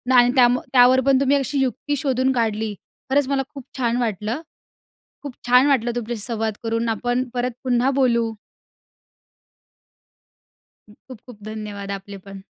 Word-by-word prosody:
आणि 245 0 +6
त्यामुळे 250 0 +3
त्यावर 255 +1 +6
पण 270 -1 +4
तुम्ही 275 +1 +3
अशी 275 +1 -1
युक्ती 270 +3 -1
शोधून 260 -1 +1
काढली. 220 -3 -1 0.4
खरंच 280 0 +2
मला 275 0 0
खूप 275 -3 -9
छान 240 -2 0
वाटलं. 225 - -2 0.8
खूप 285 -3 -7
छान 250 +2 +6
वाटलं 255 -5 +2
तुमच्याशी 235 -1 -4
संवाद 225 -1 -2
करून. 230 0 -1
आपण 245 +3 -1
परत 245 0 -1
पुन्हा 250 +1 +2
बोलू. 235 -4 +1 2.6
खूप-खूप 240 +1 -14
धन्यवाद 210 -2 -6
आपले 200 +1 -11
पण. 195 -1 -10
245 Hz, 135 wpm, -22 LUFS, 225-260 Hz, 2.6 s, आणि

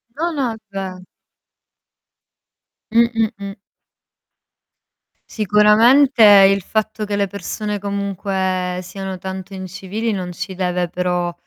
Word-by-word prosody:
No, 335 +3 -1
no 270 -6 -1
è - - -8
ve 190 -2 -6 1.9
Mh-mh-mh. 225 -3 0 1.7
Sicuramente 225 +6 +4
il 195 -1 +7
fatto 215 +2 -2
che 205 0 -3
le 200 0 0
persone 205 +2 -5
comunque 190 -2 -2
siano 190 +1 -6
tanto 190 +1 -7
incivili 190 +4 -4
non 180 -3 -4
ci 190 +2 -6
deve 180 -1 -1
però, 180 0 -2
200 Hz, 100 wpm, -19 LUFS, 185-215 Hz, 1.9 s, il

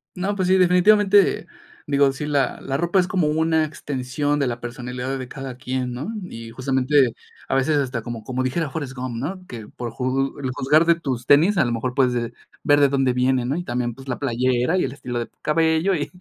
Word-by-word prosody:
No, 195 +3 -2
pues 185 -2 0
sí, 190 - +5
definitivamente. 195 +2 +4 0.4
Digo, 140 -1 +3
sí, 135 +2 -5
la 140 -4 0
la 135 - -3
ropa 175 +4 +2
es 180 - +2
como 180 -5 +1
una 160 +1 +2
extensión 145 0 -2
de 140 - +1
la 120 -1 -3
personalidad 125 +2 -4
de 130 - -6
cada 135 -2 -7
quien, 125 -1 -3
¿no? 140 - -5 0.2
Y 115 0 -8
justamente, 130 0 +2 0.3
a - - 0
veces 145 +3 +2
hasta 130 -4 -1
como 120 -2 -6
como 130 0 -2
dijera 150 +4 -1
Forrest 140 -2 -5
Gump, 125 -2 -5
¿no? 180 +8 -5
Que: 115 -3 -8
"Por 120 -1 -6
ju 130 +3 -1
el 130 -2 -3
juzgar 150 +6 +3
de 170 0 +5
tus 130 -7 -4
tenis, 165 +9 +5
a - - +5
lo 120 - -1
mejor 125 +2 -2
puedes, 130 -3 +3
eh, 120 0 -2 0.3
ver 145 0 +4
de 140 - +5
dónde 135 -2 +1
vienen", 125 0 +1
¿no? 140 - 0
Y 175 - -3
también, 120 -4 -2
pues, 135 0 -13
la 125 - -3
playera 130 +4 +1
y - - +2
el - - -2
estilo 125 -3 -6
de 120 - -2
tu - - -41
cabello 160 +4 +2
y 145 - -3
135 Hz, 225 wpm, -22 LUFS, 125-160 Hz, 0.4 s, sí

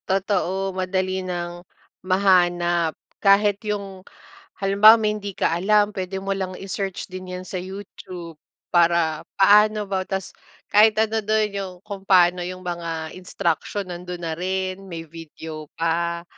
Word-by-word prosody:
Totoo, 190 0 0
madali 185 0 -1
ng 175 -1 -5 0.4
mahanap 175 -3 +2 0.2
kahit 200 0 +4
yung, 200 -3 -4 0.6
halimbawa 200 +3 +7
may 215 -1 +1
hindi 205 -1 -6
ka - - +1
alam, 205 +3 +3
pwede 190 0 -3
mo 195 0 -2
lang 190 -1 -3
i-search 195 -1 -4
din 185 0 -8
yan - - -10
sa - - -5
YouTube 185 -3 -8 0.3
para 170 -2 +3 0.2
paano 210 +2 +5
ba 190 -1 0
ta's 190 -1 -3 0.4
kahit 215 +1 +6
ano 220 0 +1
do'n 215 0 +1
yung 195 -2 -4
kung 200 -2 -7
paano 180 -1 +5
yung 185 +1 -6
mga 165 -2 -4
instruction 185 +1 -2
nando'n 180 0 -6
na 165 -1 -3
rin, 185 +2 -3
may 170 -4 -7
video 160 -1 -9
pa. 170 +1 -1
185 Hz, 140 wpm, -23 LUFS, 175-200 Hz, 0.6 s, halimbawa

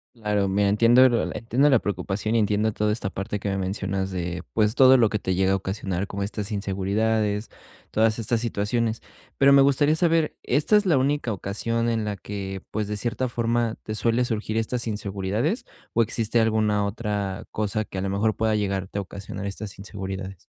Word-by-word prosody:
Claro, 105 -3 0
mira, 100 +1 +2
entiendo 120 +5 +6
la 120 - -1
entiendo 125 +6 +2
la 130 -5 +5
preocupación, 100 +3 -2
y - - +4
entiendo 105 +1 +1
toda 105 0 0
esta 100 -3 -3
parte 100 +2 -4
que 100 0 -4
me 95 - -1
mencionas 95 0 -2
de, 90 0 -4
pues, 105 0 +2
todo 130 0 +7
lo 115 -4 +4
que 105 - -1
te 95 -1 -1
llega 95 +1 +2
a - - +3
ocasionar, 95 -1 -3
como 100 0 -4
estas 105 +1 -4
inseguridades, 105 +2 0 0.4
todas 110 0 +2
estas 115 +1 0
situaciones. 115 0 -1 0.4
Pero 140 0 +6
me 140 0 +7
gustaría 140 +2 +4
saber, 165 -2 +2
¿esta 150 - +3
es 205 - +1
la 160 -7 +4
única 135 -3 0
ocasión 115 +4 -2
en 110 -2 -1
la 105 -1 -2
que, 95 -1 -6
pues, 105 -1 -2
de 105 - -3
cierta 120 +4 -1
forma, 115 -1 0
te 110 - -5
suele 115 +3 +2
surgir 110 -2 -2
estas 115 +1 -1
inseguridades 105 - -2 0.3
o 115 - +2
existe 115 0 +1
alguna 110 -2 +2
otra 100 -2 -3
cosa 110 0 -1
que, 95 - -9
a - - -1
lo 100 - -2
mejor, 105 +2 +1
pueda 110 -1 +1
llegarte 100 -1 -2
a - - 0
ocasionar 100 +1 -7
estas 100 0 -6
inseguridades? 95 -2 -6
105 Hz, 190 wpm, -24 LUFS, 100-115 Hz, 0.4 s, todo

